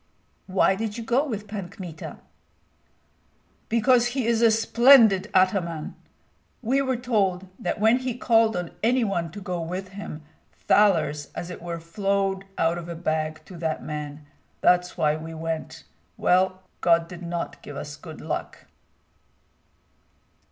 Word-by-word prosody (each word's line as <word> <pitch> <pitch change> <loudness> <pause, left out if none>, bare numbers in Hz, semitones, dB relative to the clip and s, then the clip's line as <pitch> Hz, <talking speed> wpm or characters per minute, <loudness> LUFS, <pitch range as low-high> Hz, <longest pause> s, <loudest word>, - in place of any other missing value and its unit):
"Why 190 0 +3
did 210 +2 -4
you 230 - -5
go 240 +5 +2
with 215 -8 -5
Pan 200 -4 -5
Kmita?" 175 -6 -8 1.5
"Because 240 +2 +4
he 255 - +1
is 230 0 +2
a 230 - +7
splendid 225 -2 +5
ataman. 185 -4 +1 0.7
We 260 +5 +2
were 260 -2 0
told 200 -7 0
that 175 - -2
when 225 +4 +4
he 255 -2 -3
called 225 -4 +3
on 175 -1 -4
any 245 +3 +3
one 175 -6 -1
to 180 - -9
go 180 -3 -4
with 185 +3 -5
him, 195 -6 -8 0.3
thalers 160 -8 +2
as 175 - -5
it 180 - -8
were 170 -1 -5
flowed 195 +3 -1
out 165 +1 +1
of 170 0 -8
a 170 - -4
bag, 155 -1 -2
to 185 - -11
that 160 -1 -2
man. 150 -1 -6 0.4
That's 180 0 +3
why 155 -2 +2
we 160 +1 -8
went. 160 0 -5 0.3
Well, 185 +1 +2 0.2
God 170 -1 +3
did 175 0 -10
not 170 0 -4
give 145 - -9
us 145 +1 -6
good 155 +1 -11
luck!" 155 - -5
185 Hz, 150 wpm, -25 LUFS, 165-220 Hz, 1.5 s, a